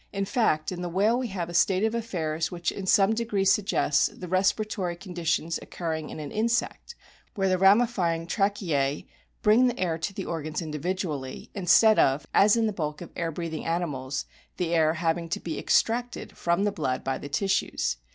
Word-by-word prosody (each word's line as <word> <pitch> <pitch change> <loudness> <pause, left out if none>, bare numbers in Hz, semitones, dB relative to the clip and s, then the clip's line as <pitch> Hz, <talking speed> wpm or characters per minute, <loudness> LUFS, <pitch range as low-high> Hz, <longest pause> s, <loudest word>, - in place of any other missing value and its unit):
In 195 0 -2
fact, 190 - +1
in 180 -1 -5
the 175 - -3
whale 210 +7 +2
we 255 - -2
have 185 -5 -4
a 175 - -8
state 185 +3 +3
of 220 0 +1
affairs 165 -9 -2
which 175 -2 -2
in 195 -1 -6
some 195 +3 +4
degree 220 -4 -1
suggests 195 -7 +3
the 180 - -9
respiratory 190 0 0
conditions 170 -3 -2
occurring 160 -3 -4
in - - -7
an 150 -2 -6
insect, 235 - -1 0.4
where 195 -1 +1
the 185 -1 +1
ramifying 195 -5 +3
tracheae 170 -8 0 0.4
bring 225 +4 +5
the 245 - -2
air 165 -3 -1
to 180 - -2
the 195 -1 -6
organs 155 -2 -4
individually, 155 -3 -4
instead 200 +4 +5
of 135 +2 +3
as 205 +2 +5
in 225 - +2
the 215 - -1
bulk 150 -4 -3
of 175 - -9
air 165 -1 -2
breathing 165 0 -5
animals 145 -6 -2 0.3
the 170 -2 -1
air 160 -1 +3
having 165 0 -1
to - - -2
be 165 - -5
ex - - +4
tracted 240 +2 -4
from 170 +3 0
the 205 - +1
blood 135 -8 -2
by 135 -1 -2
the 140 - -8
tissues. 195 - 0
175 Hz, 190 wpm, -26 LUFS, 160-205 Hz, 0.4 s, bring